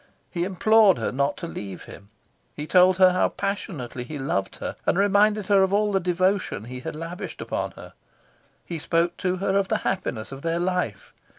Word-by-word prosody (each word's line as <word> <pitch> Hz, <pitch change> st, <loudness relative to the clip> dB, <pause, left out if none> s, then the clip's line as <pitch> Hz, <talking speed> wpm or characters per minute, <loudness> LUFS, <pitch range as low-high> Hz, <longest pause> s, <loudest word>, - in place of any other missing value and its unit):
He 175 Hz, 0 st, -1 dB
implored 200 Hz, +1 st, +4 dB
her -, -, -2 dB
not 140 Hz, +2 st, 0 dB
to 170 Hz, -, -5 dB
leave 100 Hz, -, -7 dB
him. 100 Hz, -, -13 dB, 0.5 s
He 150 Hz, -, -5 dB
told 185 Hz, +2 st, +5 dB
her 185 Hz, -1 st, +7 dB
how 180 Hz, -, +2 dB
passionately 155 Hz, -11 st, -4 dB
he 150 Hz, +4 st, -7 dB
loved 100 Hz, -8 st, -2 dB
her, -, -, -5 dB
and -, -, +3 dB
reminded 205 Hz, +1 st, +3 dB
her 200 Hz, 0 st, +4 dB
of 190 Hz, 0 st, +2 dB
all 210 Hz, 0 st, +2 dB
the 195 Hz, -, +2 dB
devotion 185 Hz, -, 0 dB
he 125 Hz, +2 st, -7 dB
had 130 Hz, -, -6 dB
lavished 165 Hz, +4 st, -7 dB
upon -, -, -3 dB
her. -, -, -12 dB, 0.7 s
He 170 Hz, -2 st, -5 dB
spoke 170 Hz, +3 st, 0 dB
to 185 Hz, -1 st, -1 dB
her 195 Hz, +1 st, -1 dB
of 200 Hz, -1 st, +2 dB
the -, -, +1 dB
happiness 130 Hz, -13 st, -2 dB
of 135 Hz, 0 st, -8 dB
their 165 Hz, +1 st, -1 dB
life. 175 Hz, -, -2 dB
180 Hz, 195 wpm, -24 LUFS, 145-195 Hz, 0.7 s, her